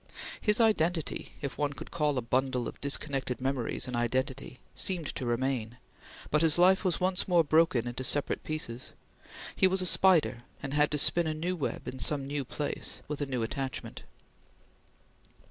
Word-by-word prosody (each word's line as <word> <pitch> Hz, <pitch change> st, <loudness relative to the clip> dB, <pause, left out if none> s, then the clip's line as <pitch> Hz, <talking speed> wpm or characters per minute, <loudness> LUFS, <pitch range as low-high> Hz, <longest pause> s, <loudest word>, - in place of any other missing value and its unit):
His 210 Hz, +1 st, +4 dB
identity, 175 Hz, -8 st, +1 dB
if 140 Hz, -, -5 dB
one 145 Hz, -1 st, 0 dB
could -, -, -10 dB
call 150 Hz, -4 st, 0 dB
a 125 Hz, -, -1 dB
bundle 125 Hz, 0 st, 0 dB
of -, -, -9 dB
disconnected 140 Hz, -2 st, 0 dB
memories 130 Hz, -2 st, -1 dB
an 125 Hz, -, -4 dB
identity, 130 Hz, +2 st, -2 dB
seemed 175 Hz, -6 st, -1 dB
to 125 Hz, -, -4 dB
remain; 120 Hz, -1 st, -1 dB, 0.5 s
but 150 Hz, -, +3 dB
his 165 Hz, -1 st, +4 dB
life 185 Hz, +3 st, +5 dB
was 185 Hz, -3 st, 0 dB
once 185 Hz, 0 st, +1 dB
more 175 Hz, -3 st, +4 dB
broken 155 Hz, -6 st, +3 dB
into 120 Hz, +2 st, -4 dB
separate 145 Hz, +2 st, 0 dB
pieces; 130 Hz, -6 st, -4 dB, 0.6 s
he 190 Hz, -, +5 dB
was 190 Hz, +1 st, +1 dB
a -, -, -1 dB
spider 170 Hz, -10 st, +4 dB, 0.2 s
and 135 Hz, 0 st, -4 dB
had 150 Hz, 0 st, +3 dB
to 150 Hz, -, -1 dB
spin 170 Hz, +3 st, +4 dB
a 155 Hz, -, -2 dB
new 175 Hz, +4 st, -2 dB
web 160 Hz, -, -4 dB
in 130 Hz, -, -6 dB
some 140 Hz, 0 st, 0 dB
new 140 Hz, 0 st, -3 dB
place 145 Hz, +3 st, -4 dB
with 150 Hz, 0 st, -4 dB
a 145 Hz, -, -1 dB
new 125 Hz, -4 st, -2 dB
attachment. 130 Hz, +3 st, -5 dB
145 Hz, 175 wpm, -29 LUFS, 130-165 Hz, 0.6 s, life